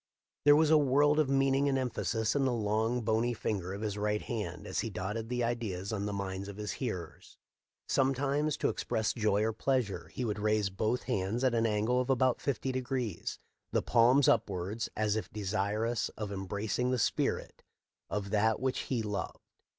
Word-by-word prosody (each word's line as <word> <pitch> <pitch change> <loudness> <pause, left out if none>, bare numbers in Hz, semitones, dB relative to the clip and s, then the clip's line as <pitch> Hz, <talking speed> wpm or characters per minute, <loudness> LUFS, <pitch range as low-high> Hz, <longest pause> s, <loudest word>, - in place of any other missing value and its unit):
There 145 0 +8
was 155 0 +4
a 155 - +7
world 145 +2 +4
of 150 -3 +2
meaning 135 +1 +3
and 135 - +1
emphasis 115 -3 -1
in 140 - +2
the 130 - +2
long, 110 +1 0
bony 115 +2 +1
finger 95 -5 -2
of 100 +2 -5
his 105 -2 -2
right 105 0 0
hand 110 -4 -4
as - - -2
he - - -1
dotted 110 +4 -4
the 125 -1 0
ideas 110 -5 -2
on 100 -1 -2
the - - -2
minds 100 -1 -4
of 100 0 -8
his 105 -2 -3
hearers. 100 -6 -6 0.5
Sometimes, 140 +3 +1
to - - +1
express 110 -1 -1
joy 105 -3 +1
or 110 0 0
pleasure, 105 -9 -1
he 120 +9 -4
would 105 -2 -2
raise 105 -1 +1
both 110 +6 -1
hands 100 +6 -1
at 130 -2 +3
an 115 -1 +2
angle 110 +4 +1
of 125 - -4
about 130 -1 +2
fifty 135 -1 -1
degrees, 130 -3 -3 0.3
the - - +1
palms 125 +3 +5
upwards, 100 +4 0
as 110 -1 +1
if 110 - -3
desirous 105 +3 -1
of 105 -2 -4
embracing 100 +5 -2
the 130 - +1
spirit 110 - -1 0.5
of 100 -1 -3
that 110 +1 +2
which 130 -1 -1
he 120 -4 0
loved. 105 -2 -3
110 Hz, 185 wpm, -31 LUFS, 105-130 Hz, 0.5 s, There